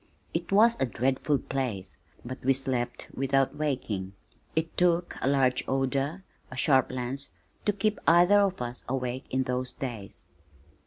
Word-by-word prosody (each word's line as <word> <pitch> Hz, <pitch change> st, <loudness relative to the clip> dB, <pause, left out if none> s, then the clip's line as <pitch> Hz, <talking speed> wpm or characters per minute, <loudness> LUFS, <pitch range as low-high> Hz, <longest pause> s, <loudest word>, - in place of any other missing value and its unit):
It 170 Hz, +2 st, -3 dB
was 225 Hz, +1 st, +5 dB
a 135 Hz, -, +3 dB
dreadful 130 Hz, +4 st, +1 dB
place, 120 Hz, -10 st, -3 dB, 0.3 s
but 130 Hz, +2 st, -7 dB
we 135 Hz, +1 st, +4 dB
slept 125 Hz, -2 st, -1 dB
without 135 Hz, +1 st, +1 dB
waking. 115 Hz, -10 st, -2 dB, 0.4 s
It 160 Hz, 0 st, -1 dB
took 175 Hz, -1 st, +2 dB
a -, -, 0 dB
large 135 Hz, -2 st, +3 dB
odor, 135 Hz, +6 st, 0 dB, 0.3 s
a 130 Hz, -, -9 dB
sharp 130 Hz, 0 st, +3 dB
lance 130 Hz, +2 st, -3 dB, 0.4 s
to -, -, +5 dB
keep 210 Hz, +1 st, 0 dB
either 175 Hz, +5 st, +6 dB
of 195 Hz, -8 st, +1 dB
us 120 Hz, +1 st, -5 dB
awake 130 Hz, 0 st, -2 dB
in 130 Hz, +1 st, +1 dB
those 125 Hz, 0 st, -2 dB
days. 115 Hz, -7 st, -6 dB
135 Hz, 150 wpm, -28 LUFS, 125-160 Hz, 0.4 s, either